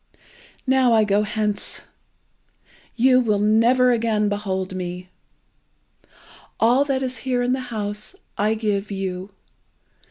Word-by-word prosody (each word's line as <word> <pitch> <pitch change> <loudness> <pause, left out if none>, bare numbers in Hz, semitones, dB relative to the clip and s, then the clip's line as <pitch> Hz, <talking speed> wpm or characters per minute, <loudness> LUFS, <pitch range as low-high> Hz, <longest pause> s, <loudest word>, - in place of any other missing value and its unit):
"Now 260 -2 +3
I 220 -1 +5
go 205 0 +2
hence! 210 -1 -2 1.1
You 255 +1 +4
will 220 -5 +1
never 230 +5 +4
again 225 -3 +1
behold 190 -2 -3
me! 180 0 -6 1.5
All 245 +5 +4
that 270 -2 -1
is 255 0 -3
here 250 -2 -1
in 250 +1 +1
the 260 - -1
house 210 - -4 0.2
I 215 +2 +1
give 210 -2 -2
you! 190 -1 -4
215 Hz, 120 wpm, -22 LUFS, 205-245 Hz, 1.5 s, I